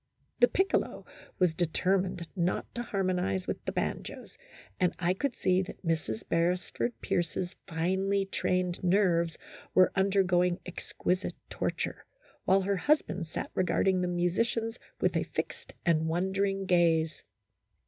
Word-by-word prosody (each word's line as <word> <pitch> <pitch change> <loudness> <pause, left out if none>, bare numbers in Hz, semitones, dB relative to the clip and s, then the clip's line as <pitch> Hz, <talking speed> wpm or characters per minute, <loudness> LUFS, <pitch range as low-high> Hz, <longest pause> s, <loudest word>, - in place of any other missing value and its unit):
The 245 - +7
piccolo 380 +7 0 0.3
was 180 -3 +3
determined 180 +1 0
not 180 -1 0
to 240 - -3
harmonize 185 - 0
with - - -4
the - - -1
banjos, - - -4 0.4
and 180 - +2
I 180 0 +1
could 245 +6 -2
see 185 0 +2
that 190 0 -8
Mrs. 160 -10 -1
Beresford 180 +7 0
Pierce's 175 +1 -1
finely 190 +4 +1
trained 180 -2 -1
nerves 175 -3 +3 0.4
were 185 - +6
undergoing 190 -2 +3
exquisite 180 +1 -2 0.2
torture, - - -3 0.4
while 195 +1 +5
her 195 +1 0
husband 185 - +1
sat 160 - -5
regarding 185 0 +2
the 180 - 0
musicians 220 +7 0 0.2
with - - +1
a - - +2
fixed - - -4
and 160 -2 +3
wondering 195 +3 0
gaze. 165 -3 +3
180 Hz, 130 wpm, -30 LUFS, 170-195 Hz, 0.4 s, The